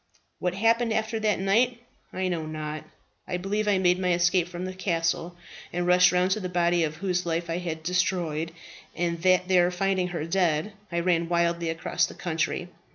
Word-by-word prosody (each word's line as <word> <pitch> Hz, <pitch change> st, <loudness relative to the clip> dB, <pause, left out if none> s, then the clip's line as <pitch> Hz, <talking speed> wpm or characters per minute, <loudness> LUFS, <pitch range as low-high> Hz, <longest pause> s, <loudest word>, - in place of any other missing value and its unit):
"What 180 Hz, 0 st, -1 dB
happened 230 Hz, +2 st, +2 dB
after 220 Hz, 0 st, -1 dB
that 215 Hz, -2 st, +1 dB
night 230 Hz, +6 st, +2 dB, 0.3 s
I 185 Hz, 0 st, -2 dB
know 165 Hz, -3 st, -2 dB
not. 155 Hz, -1 st, -5 dB, 0.4 s
I 180 Hz, -, -2 dB
believe 200 Hz, +4 st, -1 dB
that 210 Hz, -, +2 dB
I -, -, +3 dB
made 180 Hz, -1 st, +3 dB
my 180 Hz, -1 st, +1 dB
escape 175 Hz, 0 st, +2 dB
from 175 Hz, +1 st, -6 dB
the 185 Hz, -, -5 dB
castle 170 Hz, -2 st, -1 dB, 0.3 s
and 175 Hz, 0 st, -1 dB
rushed 180 Hz, 0 st, +6 dB
round 180 Hz, +1 st, +2 dB
to 215 Hz, -, +1 dB
the 185 Hz, -3 st, -4 dB
body 175 Hz, -1 st, +2 dB
of 155 Hz, -1 st, -2 dB
her -, -, -15 dB
whose 180 Hz, -2 st, 0 dB
life 170 Hz, 0 st, -1 dB
I 170 Hz, -, -1 dB
had 160 Hz, -3 st, -5 dB
destroyed, 165 Hz, -2 st, 0 dB, 0.4 s
and 170 Hz, -1 st, -1 dB
that 185 Hz, 0 st, +3 dB
there 180 Hz, -2 st, +4 dB
finding 185 Hz, 0 st, 0 dB
her 170 Hz, -3 st, -4 dB
dead, 170 Hz, +1 st, +1 dB, 0.2 s
I 170 Hz, 0 st, 0 dB
ran 170 Hz, -1 st, +1 dB
wildly 170 Hz, -1 st, +1 dB
across 165 Hz, 0 st, 0 dB
the -, -, -11 dB
country. 170 Hz, +1 st, -2 dB
180 Hz, 200 wpm, -26 LUFS, 170-185 Hz, 0.4 s, rushed